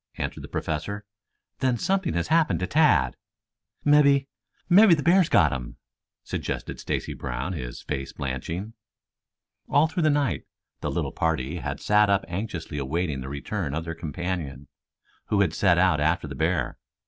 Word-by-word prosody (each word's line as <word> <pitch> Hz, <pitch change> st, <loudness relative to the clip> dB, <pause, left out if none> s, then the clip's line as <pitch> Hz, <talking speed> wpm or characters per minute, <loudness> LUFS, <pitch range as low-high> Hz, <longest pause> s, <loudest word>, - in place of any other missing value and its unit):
answered -, -, -4 dB
the -, -, -7 dB
Professor. 100 Hz, +7 st, -3 dB, 0.5 s
"Then 130 Hz, -2 st, +1 dB
something 190 Hz, +6 st, 0 dB
has 85 Hz, -, -1 dB
happened 160 Hz, -1 st, +3 dB
to -, -, +1 dB
Tad." 125 Hz, -, +3 dB, 0.7 s
"Mebby 140 Hz, -2 st, +5 dB, 0.4 s
mebby 185 Hz, 0 st, +7 dB
the 150 Hz, -, -3 dB
bear's 175 Hz, 0 st, +4 dB
got 75 Hz, -8 st, +4 dB
him," 60 Hz, -2 st, -6 dB, 0.5 s
suggested -, -, -4 dB
Stacy -, -, -3 dB
Brown, 65 Hz, +7 st, -4 dB
his 60 Hz, -7 st, -6 dB
face 65 Hz, 0 st, -4 dB
blanching. 80 Hz, -, -4 dB, 1.0 s
All 145 Hz, -, +5 dB
through 165 Hz, +3 st, -2 dB
the 155 Hz, -, +4 dB
night 145 Hz, -2 st, 0 dB, 0.3 s
the -, -, -3 dB
little -, -, -2 dB
party 80 Hz, -1 st, -1 dB
had -, -, -4 dB
sat 105 Hz, 0 st, +3 dB
up 100 Hz, 0 st, +2 dB
anxiously 85 Hz, -5 st, -4 dB
awaiting 75 Hz, 0 st, -2 dB
the 65 Hz, -, -6 dB
return 70 Hz, +2 st, -3 dB
of 80 Hz, -, -2 dB
their 80 Hz, -, -4 dB
companion, 80 Hz, -4 st, -5 dB, 0.6 s
who 100 Hz, -, +2 dB
had 90 Hz, -5 st, +2 dB
set 90 Hz, -2 st, +3 dB
out 90 Hz, -3 st, +4 dB
after 80 Hz, +2 st, +1 dB
the 70 Hz, -, -6 dB
bear. 80 Hz, +6 st, -1 dB
90 Hz, 160 wpm, -26 LUFS, -, 1.0 s, mebby